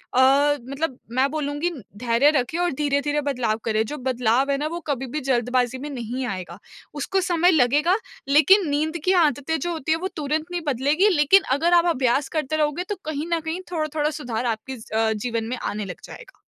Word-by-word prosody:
अ, 280 +3 +4
मतलब 275 -1 -3 0.2
मैं 270 +2 +3
बोलूँगी 295 +2 -2 0.3
धैर्य 240 +4 +3
रखें 290 +2 -1
और 355 -1 +1
धीरे-धीरे 290 +1 0
बदलाव 250 -6 -1
करें, 220 -1 +1
जो 300 +6 -6
बदलाव 250 +1 +1
है 275 - +1
ना 295 - -2
वो 340 +2 -4
कभी 270 -2 -1
भी - - +1
जल्दबाज़ी 250 0 +1
में 290 +3 -6
नहीं 250 -1 -4
आएगा, 185 -3 -6 0.3
उसको 370 +7 -1
समय 350 0 +3
लगेग। 295 +1 +3 0.4
लेकिन 315 +7 +5
नींद 310 +3 0
की 370 - +4
आदतें 295 +2 0
जो 350 0 -2
होती 315 -2 -3
हैं 325 - -1
वो 375 - -1
तुरंत 305 +1 -1
नहीं 350 -1 -2
बदलेगी 290 - +2
लेकिन 360 +3 +5
अगर 340 +3 +2
आप 345 0 +5
अभ्यास 260 +2 +1
करते 310 0 -1
रहोगे, 300 +3 0
तो 410 +2 -4
कहीं 305 0 -3
न 335 - +2
कहीं 320 +3 -4
थोड़ा-थोड़ा 310 -2 -1
सुधार 240 -1 -3
आपके 235 +3 -3
ज 220 - -14
अ, 220 0 +2
जीवन 225 +1 -3
में 250 - -3
आने 210 0 -3
लग 180 - -8
जाएगा। - - -13
285 Hz, 200 wpm, -23 LUFS, 250-315 Hz, 0.4 s, लेकिन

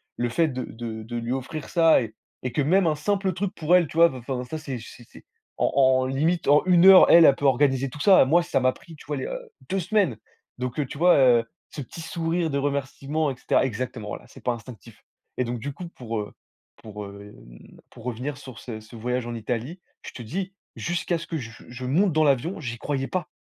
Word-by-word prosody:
le 120 0 -1
fait 165 +7 +2
de 130 -3 -4
de 110 -1 -7
de 120 +2 -7
lui 120 +1 -2
offrir 135 +4 -5
ça 165 -4 +4
et 110 -2 -6 0.3
et 125 - -2
que 150 - +1
même 175 +6 +3
un 155 - +2
simple 195 +4 -1
truc 185 +2 -3
pour 165 +2 +3
elle, 175 -3 +4
tu 160 - -9
vois, 170 0 +7
enfin, 125 0 -4
ça, 160 +6 -5
c'est 140 -4 -5
c'est 115 +2 -12
c'est - - -16 0.3
en - - +1
en 130 -1 +4
limite, 155 +7 0
en 145 +1 +5
1 180 -1 +5
heure, 190 -1 +9
elle, 170 -1 +9
elle 140 - +6
peut 145 - -4
organiser 135 0 +2
tout 145 - -11
ça. 190 +5 +6
Moi, 160 +7 +4
ça 135 -5 0
m'a 130 0 +3
pris, 160 +5 -14
tu - - -15
vois, 145 +1 -3
il - - -4
y - - -3
a - - -5
heu, - - -8 0.2
2 195 +1 0
semaines. 185 - +1 0.4
Donc 125 +2 -3
heu, 145 - +1
tu 135 - -9
vois, 175 +3 +5
heu, 125 -4 +5 0.3
ce 145 - -6
petit 140 +5 -10
sourire 165 0 -2
de 140 - -1
remerciement 140 +2 -1
et 130 - -6
cetera - - +1
exactement, 120 -2 -4
voilà, - - -6
c'est - - -15
pas 125 - +1
instinctif 115 -4 -12 0.3
et 125 - +1
donc 120 0 -4
du 140 +5 -5
coup, 175 +4 -8
pour, 115 -8 -5
heu, 105 - -8 0.5
pour, 105 -1 -9
hem, 100 -12 -14
pour 115 - -15
revenir 125 +4 -4
sur 130 -5 -11
ce 115 -3 -7
ce 110 +2 -14
voyage 125 +1 -2
en 120 - -5
Italie, 120 - -4 0.2
je - - -8
te - - -9
dis, 185 - -4 0.2
jusqu'à 175 0 -1
ce 170 - -9
que 165 - -4
je 120 -6 -7 0.2
je 125 +1 -8
monte 170 +7 +2
dans 155 - +3
l'avion, 145 +5 +1
j'y 120 -4 -5
croyais 135 +1 -2
pas 185 -1 -3
135 Hz, 245 wpm, -25 LUFS, 120-165 Hz, 0.5 s, heure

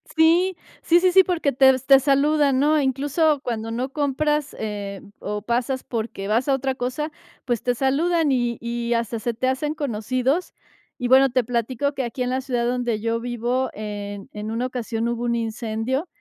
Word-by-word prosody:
Sí, 340 +4 +4 0.3
sí, 345 +1 +5
sí, 365 +1 +3
sí, 380 +1 +7
porque 340 -6 0
te 265 +1 +6
v 260 - -1
te 270 -1 +7
saludan, 280 0 +3
¿no? 300 +2 +3
Incluso 285 +2 +1
cuando 225 -2 -3
no 250 +4 -2
compras, 295 +1 0
eh, 205 -2 -5 0.2
o 210 0 -4
pasas 245 +4 -1
porque 220 -4 -4
vas 230 +6 +1
a 275 - +3
otra 270 0 -1
cosa, 260 +5 -3 0.3
pues, 240 -4 -1
te 245 0 +1
saludan 300 +5 +1
y 240 -3 0
y 235 0 -2
hasta 230 -1 -1
se 235 +2 -2
te 245 +3 -1
hacen 280 +4 -1
conocidos. 260 - -1 0.5
Y 245 - -2
bueno, 265 +1 +6
te 255 0 +1
platico 245 +4 -1
que 270 - -2
aquí 250 +2 -3
en 250 - -2
la 260 +1 0
ciudad 245 -3 -1
donde 240 -2 -1
yo 230 +1 0
vivo, 245 +2 -1
en 205 -1 -6
en 210 +1 -5
una 230 +2 -1
ocasión 235 -2 -3
hubo 240 0 -3
un 235 -1 0
incendio 230 +5 -2
255 Hz, 190 wpm, -23 LUFS, 230-280 Hz, 0.5 s, sí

